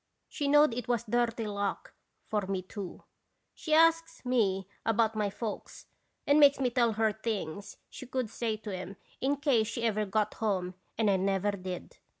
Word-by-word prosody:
She 290 - -3
knowed 295 -2 +5
it 240 -1 -4
was 240 -2 +1
dirty 235 0 0
luck 200 -1 -3 0.3
for 210 -1 -1
me, 190 -1 -2
too. 190 -1 -8 0.5
She 315 - -7
asks 330 -1 +3
me 195 -7 +1 0.2
about 225 0 +2
my 210 -1 0
folks 215 +2 -6 0.4
and 285 +1 +5
makes 285 -1 +6
me 255 -2 +1
tell 235 -2 +2
her 220 0 +1
things 205 -3 -4
she 260 - -10
could 255 -2 -2
say 225 0 -2
to 210 -2 -6
'em 185 +2 -7 0.2
in 275 +2 +1
case 270 -6 +2
she 235 +1 -4
ever 215 -2 +1
got 210 +1 0
home 185 -4 -1 0.2
and 220 -1 +2
I 195 -1 +4
never 195 +1 +1
did. 185 -2 -7
220 Hz, 175 wpm, -30 LUFS, 200-245 Hz, 0.5 s, makes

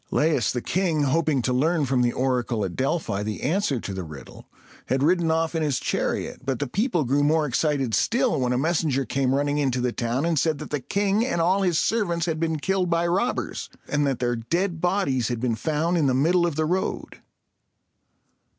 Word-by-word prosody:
Laius, 150 -8 +2
the 125 - -3
king, 170 -5 0
hoping 145 -1 +1
to 125 - 0
learn 155 +4 +2
from 130 -1 +1
the 120 -1 +2
oracle 125 -5 -1
at 90 - -5
Delphi 130 - -1
the 105 0 -4
answer 155 - 0
to 100 - -6
the 95 - -4
riddle, 75 -4 -11 0.4
had 135 +1 +1
ridden 170 +1 +2
off 160 +1 +1
in 165 - -1
his 145 -5 0
chariot; - - -2
but 135 -2 -1
the 145 - -2
people 180 - 0
grew 140 +3 +1
more 155 +2 +2
excited 135 -3 0
still, 240 - +1
when 125 -1 0
a 125 - +1
messenger 145 -2 0
came 135 0 0
running 145 +1 0
into 130 -3 0
the 125 0 0
town, 120 +5 -1
and 165 -3 +1
said 160 -2 +1
that - - -8
the 145 - 0
king 200 - 0
and 240 -9 -1
all 185 +4 +2
his 180 -4 +1
servants 175 -7 0
had 160 -2 -2
been 160 -1 0
killed 185 +3 0
by 170 0 +1
robbers, 195 +9 -1 0.2
and 145 -1 +1
that 135 -3 0
their 120 0 0
dead 170 - -2
bodies 175 - +1
had 120 -2 -2
been 120 -1 0
found 155 +8 -1
in 145 - +2
the 130 - +2
middle 175 +6 +3
of 165 - -3
the 155 +1 0
road. 180 +4 -3
150 Hz, 210 wpm, -24 LUFS, 130-170 Hz, 0.4 s, middle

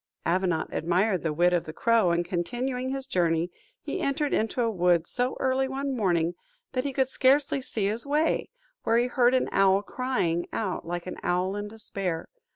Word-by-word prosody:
Avenant 175 -3 0
admired 180 +3 +1
the 160 - -1
wit 175 +4 +3
of 175 - +1
the 155 - -7
crow, 230 -1 +3
and 170 0 +1
continuing 245 +9 -2
his 270 0 -3
journey, 170 -3 +1 0.3
he - - -3
entered 280 +1 0
into 225 +3 +1
a 230 - +1
wood 175 -3 +2
so 250 +5 -1
early 265 0 +1
one 270 0 -3
morning, 175 -6 +1 0.4
that 255 - -1
he 280 - -2
could 265 -1 +1
scarcely 270 +1 +2
see 220 -5 -2
his 215 +4 0
way, 300 +3 +1 0.3
where 225 +1 +2
he 240 - +3
heard 250 0 +3
an 255 - +2
owl 195 0 +4
crying 200 -9 -1
out 190 -6 -3
like 175 0 -3
an 185 - -6
owl 180 +2 0
in 205 0 -4
despair. 195 -5 -4
205 Hz, 185 wpm, -27 LUFS, 175-255 Hz, 0.4 s, owl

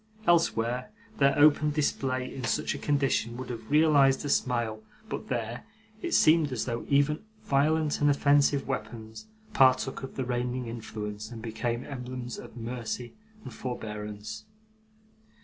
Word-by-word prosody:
Elsewhere, 125 - +2 0.3
their 140 0 +4
open 150 0 +5
display 135 -4 -1
in 130 - -6
such 115 - 0
a - - -6
condition 135 -5 0
would 130 0 -5
have 115 -2 -8
realised 145 -3 +4
a - - -2
smile; 120 -5 0 0.3
but, - - -5
there, 120 -1 -3 0.4
it 345 - 0
seemed 155 -2 +5
as 125 -4 -2
though 120 -1 -4
even 145 +2 +3 0.2
violent 150 +2 +2
and 145 - +5
offensive 140 0 +3
weapons 110 -4 -5 0.3
partook 130 -4 +4
of 135 - -7
the 130 - -2
reigning 125 0 -2
influence, 110 -2 -6
and 120 -2 -8
became 120 +2 -2
emblems 125 -2 -6
of - - -11
mercy 120 0 -5 0.3
and - - -8
forbearance. 110 -3 -6
125 Hz, 140 wpm, -28 LUFS, 115-140 Hz, 0.4 s, open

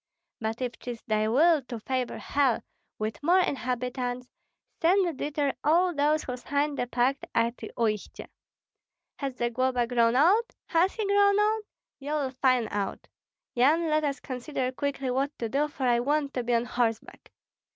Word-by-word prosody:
But 225 +3 -3
if 245 -1 -4
'tis 240 -2 -7
thy 215 0 0
will 305 +7 +4
to 235 -3 -5
favor 255 +2 -2
hell 275 -5 +1 0.3
with 215 +1 -4
more 345 +5 +4
inhabitants, 250 -5 -1 0.5
send 345 -3 +2
thither 290 -1 -1
all 345 +4 +3
those 300 +1 +2
who 250 - -4
signed 285 +3 -1
the 245 - -1
pact 250 +3 0
at 235 +1 +2 0.2
Uistsie. 215 -3 -2 0.9
Has 275 -3 -4
Zagloba 245 +1 0
grown 235 -1 +2
old? 390 - +3
has 355 +2 +2
he 440 - -2
grown 400 0 +4
old? 425 +1 +1 0.3
You 290 +2 -4
will 285 -4 -1
find 255 -3 +2
out! 200 -1 -3 0.5
Yan, 310 +7 +3
let 310 0 +2
us 285 -2 -1
consider 255 0 -3
quickly 275 -1 -2
what 275 +3 -1
to 230 - -2
do, 280 +6 0
for 290 -3 -7
I 240 -2 +3
want 285 +2 0
to 250 - -1
be 240 0 0
on 235 +1 +1
horseback." 240 -2 -2
265 Hz, 160 wpm, -27 LUFS, 245-300 Hz, 0.9 s, will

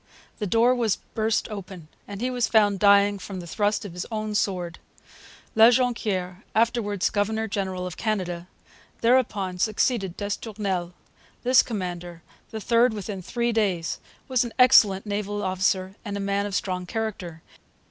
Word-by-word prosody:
The 210 - -2
door 230 +6 +4
was 230 -5 +1 0.2
burst 220 0 0
open, 190 -5 -8 0.2
and 200 0 -7
he 255 +1 0
was 245 -2 0
found 205 -3 +3
dying 200 0 +5
from 190 +1 -7
the 175 - -8
thrust 205 +4 0
of 190 - -7
his 180 +1 -5
own 215 -1 -3
sword. 180 -4 -1 0.7
La 225 +1 +8
Jonquiere, 215 -7 0
afterwards 220 -4 +1
governor 220 +2 0
general 190 -3 -3
of 180 0 -6
Canada, 180 -6 -2 0.5
thereupon 215 -7 +1
succeeded 210 -2 0
d'Estournel. 200 -4 -3 0.5
This 255 0 +6
commander, 175 -6 -5 0.3
the 220 - -5
third 230 +1 +3
within 200 -1 -5
three 235 +5 -1
days, 195 -7 0 0.3
was 255 -2 +2
an 235 - -6
excellent 210 -6 +6
naval 205 0 -3
officer 185 0 0
and 205 -2 -4
a - - -4
man 200 +1 -1
of 200 - -4
strong 180 -2 -2
character. 190 -7 -4
205 Hz, 150 wpm, -25 LUFS, 185-220 Hz, 0.7 s, La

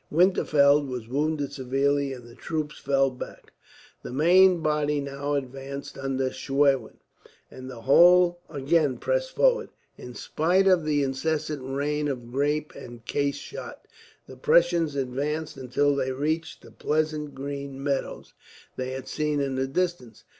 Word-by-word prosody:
Winterfeld 150 -4 +4
was 125 -3 -5
wounded 145 +2 -1
severely, 140 +1 0
and 125 -2 -9
the 120 - -14
troops 150 +3 -4
fell 135 -1 +2
back. 125 - -10 0.5
The - - -8
main 175 +5 +5
body 150 -1 +1
now 140 +1 -3
advanced, 135 +1 -6
under 135 -1 -2
Schwerin, 135 0 +1 0.5
and 130 0 -9
the 120 -3 -9
whole 175 +6 +6
again 145 -1 +1
pressed - - -1
forward. - - +3 0.3
In 125 -1 -9
spite 180 +5 +1
of 185 -4 +4
the 145 -2 +1
incessant 150 +2 -2
rain 145 +3 -1
of 120 -4 -5
grape 145 +3 -1
and 120 -1 -11
case 140 -1 0
shot, - - -9 0.4
the 130 - -12
Prussians 170 +1 +3
advanced 140 +4 -2
until 135 +2 +1
they 130 -1 -1
reached 155 +4 -2
the - - -14
pleasant 155 -1 -2
green 140 0 -6
meadows 140 -1 -3 0.4
they 130 0 -3
had 130 0 -6
seen 150 -1 -1
in 140 -1 -1
the 130 0 -1
distance. 155 - -3
140 Hz, 145 wpm, -26 LUFS, 135-155 Hz, 0.5 s, whole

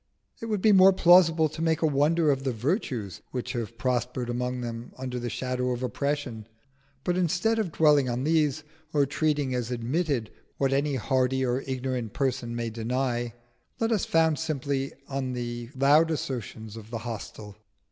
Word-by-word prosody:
It 230 - -4
would 210 -4 -1
be 215 - +6
more 190 0 +7
plausible 170 -3 +6
to 160 - -7
make 165 0 +1
a - - +5
wonder 150 +2 +3
of 135 -1 -1
the 135 - 0
virtues 120 - -2
which 125 0 -4
have 115 -2 -4
prospered 125 +1 -1
among 125 +1 -2
them 115 0 -6
under 125 -1 -4
the 120 0 -3
shadow 125 +1 -2
of 125 0 -2
oppression. 130 -3 -2 0.6
But 180 0 0
instead 185 +6 +1
of 200 -6 -1
dwelling 150 -4 +4
on 120 +2 -2
these, 155 -1 +1 0.3
or 145 -2 +4
treating 145 -1 0
as 125 -2 -2
admitted 125 0 -1 0.3
what 135 -1 +1
any 140 +1 +1
hardy 130 +1 +1
or 125 +1 0
ignorant 130 -4 -3
person 125 -3 -1
may 115 -1 -3
deny, 120 +1 -2 0.4
let 225 0 +1
us 215 -4 +1
found 160 -2 +2
simply 140 -3 -2 0.2
on 135 -2 -3
the 120 -1 -4
loud 145 +5 +5
assertions 115 -7 -4
of 110 -1 -10
the 115 - -3
hostile. 105 -2 -7
130 Hz, 170 wpm, -27 LUFS, 120-155 Hz, 0.6 s, more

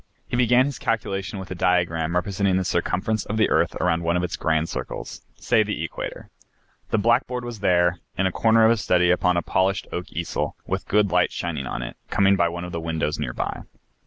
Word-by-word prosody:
He - - -3
began 125 +1 +4
his 140 -3 -4
calculation 100 -4 -2
with 95 0 -8
a - - -1
diagram 85 -2 +1
representing 95 +1 +1
the 95 - 0
circumference 105 +5 0
of 110 - -4
the 110 - +2
earth - - +2
around 85 -1 +1
one 85 +1 +1
of 90 - -1
its 90 - -2
grand 80 0 0
circles, - - -6
say 115 -3 +2
the 105 -1 -2
equator. - - -6 0.6
The - - +1
blackboard 120 +3 +1
was 120 -3 -6
there, 90 -2 +2 0.2
in 95 - +1
a 95 - +2
corner 115 +4 +4
of 110 - +6
his 115 -3 +1
study, 90 -1 +3
upon 90 0 +2
a 85 - 0
polished 95 +1 +1
oak 90 - -5
easel, 85 0 -3
with - - -3
good 105 -2 +2
light 90 0 +3
shining 75 -6 -3
on - - -4
it, - - -7
coming 100 0 +4
by 85 -3 +2
one 85 +1 -5
of 90 - -6
the 85 - -4
windows 80 -2 -2
near - - -3
by. - - -3
90 Hz, 220 wpm, -24 LUFS, 85-105 Hz, 0.6 s, of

